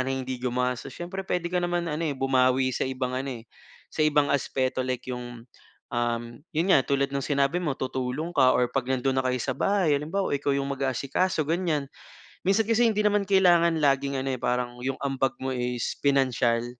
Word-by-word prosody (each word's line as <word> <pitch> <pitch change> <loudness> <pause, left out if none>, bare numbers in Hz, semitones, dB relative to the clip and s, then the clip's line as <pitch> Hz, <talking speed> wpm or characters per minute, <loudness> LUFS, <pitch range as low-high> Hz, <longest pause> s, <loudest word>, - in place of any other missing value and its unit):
na 135 - -2
hindi 130 -1 -3
gumastos. 125 0 -1
Siyempre 185 +3 -6
puwede 180 -2 -1
ka 180 0 -1
naman 175 -1 -1
ano, 155 +1 -2
eh, 155 - 0
bumawi 130 -1 +2
sa - - -1
ibang 130 -1 -3
ano, 135 +1 -3
eh, - - -18 0.4
sa 155 - -1
ibang 150 -1 +3
aspeto. 130 0 0
Like 130 0 -3
‘yong, 120 -1 -7 0.5
um, 120 0 0 0.3
‘yon 165 +4 0
nga, 135 - +6
tulad 140 0 0
ng 140 - -1
sinabi 140 +5 +1
mo, 145 -5 -2
tutulong 130 +6 -3
ka 130 -3 +5
or 125 - +3
‘pag 130 -1 -1
nando’n 130 0 +1
na - - -13
kayo 130 0 0
sa 130 0 -2
bahay, 190 -6 +2
halimbawa 160 +3 -1
ikaw 140 0 -1
‘yong 140 0 0
mag-aasikaso, 140 +5 -1
ganyan. 160 -4 0 0.6
Minsan 200 +3 +2
kasi, 230 +1 +3
hindi 210 - 0
naman 205 -1 +3
kailangan 175 -4 +4
laging 140 -1 +1
ano, 135 0 -1
eh, 125 - -7
parang 125 0 -1
‘yong 135 +1 -2
ambag 135 -2 -1
mo 130 0 -3
is 125 -1 -2
pinansiyal 130 -4 +2
135 Hz, 195 wpm, -26 LUFS, 130-160 Hz, 0.6 s, nga